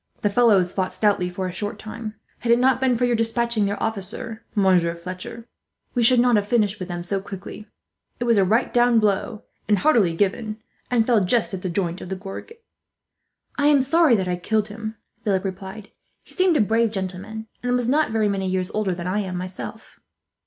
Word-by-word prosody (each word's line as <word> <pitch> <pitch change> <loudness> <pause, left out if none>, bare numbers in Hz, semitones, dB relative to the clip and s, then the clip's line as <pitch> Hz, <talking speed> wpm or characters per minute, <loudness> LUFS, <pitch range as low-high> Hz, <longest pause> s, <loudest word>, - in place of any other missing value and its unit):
The 205 - +2
fellows 200 -6 +4
fought 185 -1 -1
stoutly, 200 -4 +2
for 185 +1 -4
a 185 - -3
short 205 +4 -4
time. 215 0 -7 0.2
"Had 235 - 0
it 235 - +6
not 260 +1 +3
been 255 -2 +2
for 245 - +2
your 245 -1 +2
despatching 230 -1 +1
their 200 +1 -1
officer, 225 +2 -4
Monsieur 180 -4 +3
Fletcher, 185 +6 -8 0.5
we 245 - +1
should 240 +1 +6
not 245 -2 +4
have 205 0 -1
finished 210 -3 +1
with 185 - -5
them 175 -1 -5
so 195 +2 -2
quickly. 200 +2 -9 0.5
It - - -1
was 235 -3 +3
a - - +5
right 220 +7 +1
down 240 -1 +4
blow, 210 0 0 0.2
and 210 -1 +3
heartily 200 - +3
given, 215 +4 -1 0.3
and 235 -3 +2
fell 230 -5 +3
just 220 +3 +1
at 190 - -4
the 185 - -3
joint 175 0 -2
of - - -8
the 190 - -2
gorget." 205 - -9 1.0
"I 285 - +4
am 285 -3 +5
sorry 315 -1 +4
that 190 -3 -1
I 180 -1 -1
killed 215 +4 0
him," 220 +1 -6 0.3
Philip 195 -2 0
replied. 195 +2 -7 0.3
"He - - -15
seemed 370 -4 +3
a - - +4
brave 225 +2 +2
gentleman, 200 +2 -5 0.2
and 245 0 0
was 245 -1 0
not 300 +4 +2
very 220 -1 +1
many 195 -2 -1
years 185 0 -1
older 205 -4 -1
than 175 0 -6
I 185 +3 0
am, 190 -3 -3
myself." 185 +1 -7
210 Hz, 210 wpm, -23 LUFS, 190-235 Hz, 1.0 s, it